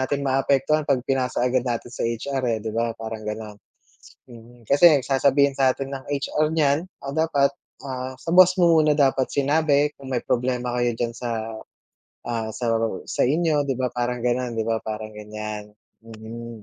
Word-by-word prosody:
natin 140 +2 -1
maapektuhan 135 +3 +2
‘pag 130 -3 +1
pinasa 130 -2 0
agad 125 +1 +2
natin 120 0 -3
sa - - -9
HR, 135 +4 -3
eh, 115 - +1
‘di 110 - -3
ba, 115 0 -1
parang 110 -1 -6
gano’n. 105 0 -6 0.8
Mm, 120 +1 -15
kasi 150 +7 +6
ang 135 - 0
sasabihin 140 +1 +3
sa'tin 135 0 0
ng 135 -1 -6
HR 145 +2 0
niyan, 150 +2 +2 0.2
ah, 135 - -4
dapat, 145 -2 +2 0.3
ah, 130 -1 -5
sa 150 +5 -6
boss 180 +1 +7
mo 170 -3 +5
muna 155 -1 +3
dapat 135 -3 +2
sinabi 145 0 +2
kung 135 - -10
may 120 - -2
problema 125 0 -1
kayo 120 -1 +1
diyan 115 0 -2
sa, 115 -2 -4 0.7
ah, 115 -2 -3
sa 120 -1 -1 0.4
sa - - 0
inyo 150 0 +1
‘di 135 - 0
ba, 125 0 -1
parang 120 0 -2
ganon 125 0 0
‘di 115 - -1
ba, 115 0 0
parang 110 0 -5
ganyan. 105 0 -7 0.3
Mm, 115 0 -9
130 Hz, 175 wpm, -23 LUFS, 115-140 Hz, 0.8 s, boss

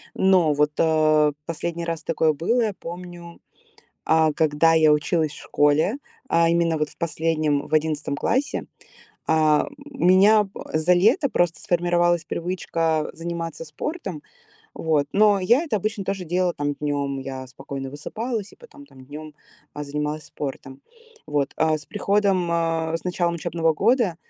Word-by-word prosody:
Но 185 -5 +4
вот, 150 +1 +2
э, 155 -2 +3
последний 170 +1 -4
раз 165 -1 -4
такое 160 -1 +1
было. 200 +12 0
Я 215 -3 0
помню, 175 -1 -9 0.6
а, 160 -1 +3
когда 160 +1 +3
я 160 -1 +5
училась 155 +1 +1
в 145 - -11
школе, 150 - +2 0.3
а 165 -4 +3
именно 170 -1 +2
вот 150 -1 -1
в - - -20
последнем, 155 -3 -1
в - - -8
11 155 -2 0
классе, 260 - -1 0.6
а, 155 -1 +3
м, - - -11 0.2
меня 205 -2 +4 0.2
за 160 +3 +3
лето 220 - +3
просто 175 -7 0
сформировалась 175 -1 +1
привычка 165 -3 -2
заниматься 165 -1 -5
спортом, 175 - -6 0.5
вот. 155 -3 0
Но 205 -1 +4
я 235 - +3
это 305 -10 -1
обычно 210 0 -3
тоже 190 -1 -3
делала 180 +1 0
там 145 0 -2
днем. 140 -1 -2
Я 130 -1 -6
спокойно 135 +1 -7
высыпалась, 215 - -5
и - - -17
потом 435 -12 -15
там 130 - -16
днем, 150 +2 -10 0.4
э, 150 - -4
занималась 150 +1 -3
спортом, 140 -3 -7 0.4
вот. 145 -2 -1
А 160 0 +2
с 150 - -15
приходом, 200 -2 +1
э, 165 -1 0
с - - -12
началом 175 -1 0
учебного 165 -1 0
года, 220 - +2
165 Hz, 150 wpm, -23 LUFS, 150-180 Hz, 0.6 s, я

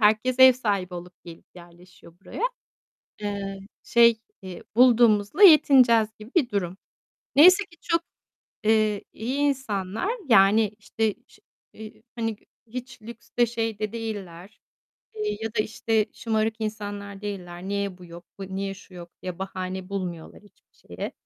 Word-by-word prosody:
herkes 220 +4 +2
ev 260 0 +9
sahibi 200 -7 -2
olup 175 +1 -9
gelip 170 -1 -12
yerleşiyor 175 0 -16
buraya. 395 - -8 0.8
Eee, 200 -1 -4 0.2
şey, 235 -1 +4 0.2
eee, 185 -2 -9
bulduğumuzla 235 - +4
yetineceğiz 260 - +7
gibi 215 +3 -12
bir 310 -9 +3
durum. 190 -2 -3 0.6
Neyse 370 +7 +7
ki 345 -1 -21
çok, 335 0 0 0.6
eee, 215 -1 +2
iyi 245 +5 -4
insanlar. 255 - -1 0.2
Yani, 210 0 +5
işte, 220 0 -2
ş - - -22 0.3
eee, 220 +1 -12
hani, 225 -2 -2
gü - - -31 0.2
hiç 250 +1 -8
lükste 235 +1 -2
şeyde 225 -3 -3
değiller, 205 -4 -7 0.6
eee, 210 -1 -3
ya 225 0 -4
da, - - 0
işte, 220 0 0
şımarık 220 -1 -1
insanlar 205 -2 -6
değiller. 180 -4 -7
Niye 200 -2 -3
bu 180 - -13
yok, 170 0 -12
bu 190 0 -7
niye 195 0 -3
şu 195 -1 -16
yok 175 -1 -11
diye 185 -1 -6
bahane 185 0 -5
bulmuyorlar 180 -5 -6
hiçbir 205 - -26
şeye. - - -7
210 Hz, 140 wpm, -25 LUFS, 190-230 Hz, 0.8 s, ev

